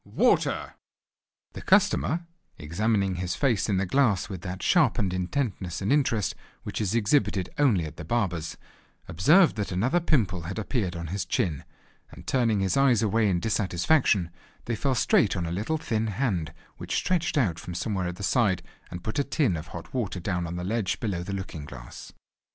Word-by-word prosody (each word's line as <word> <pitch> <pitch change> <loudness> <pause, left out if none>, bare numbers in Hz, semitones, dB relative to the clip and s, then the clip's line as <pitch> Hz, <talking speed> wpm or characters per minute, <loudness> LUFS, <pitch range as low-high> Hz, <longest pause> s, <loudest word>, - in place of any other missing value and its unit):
water!" - - +1 0.8
The - - -7
customer, 160 - +2 0.3
examining 95 +4 0
his 90 0 -2
face 120 -7 +1
in 100 - +2
the 95 - +1
glass 110 -3 +2
with 95 -4 -6
that 95 0 -6
sharpened 120 - +3
intentness 90 - -2
and 100 +7 +1
interest 120 -8 +1 0.3
which - - -4
is 105 +1 0
exhibited 105 -5 +1
only 110 - +3
at 75 - -9
the 80 - -6
barber's, 90 -5 -2 0.5
observed 155 - +4
that 105 -2 -2
another 115 - +2
pimple 110 - +1
had 85 +6 -6
appeared 105 -5 -2
on 85 0 -5
his 100 -2 -1
chin, 80 -7 -1 0.4
and - - -13
turning 115 -6 +1
his 95 -1 +1
eyes 135 -5 +4
away 110 0 +2
in 90 -2 +1
dissatisfaction 100 - +1 0.3
they 120 - -1
fell 135 +4 0
straight 110 -3 +3
on 85 - -1
a - - -3
thin 85 - -3 0.5
little 105 - -3
hand, 90 - -1 0.3
which - - -4
stretched 175 -3 0
out 95 - +1
from 90 - -7
somewhere 95 0 -2
at 90 - -4
the 100 - -8
side, 100 -5 +2 0.3
and 90 0 -7
put 110 +8 -2
a - - +3
tin 140 - +1
of 80 0 -6
hot 85 +2 -9
water 110 -8 -2
down 90 -1 -2
on 85 - -5
the 90 - -4
ledge 105 +1 -1
below 100 -7 -2
the 90 +3 -5
looking 95 -6 -5
glass. 65 -4 -10
100 Hz, 185 wpm, -27 LUFS, 90-120 Hz, 0.8 s, observed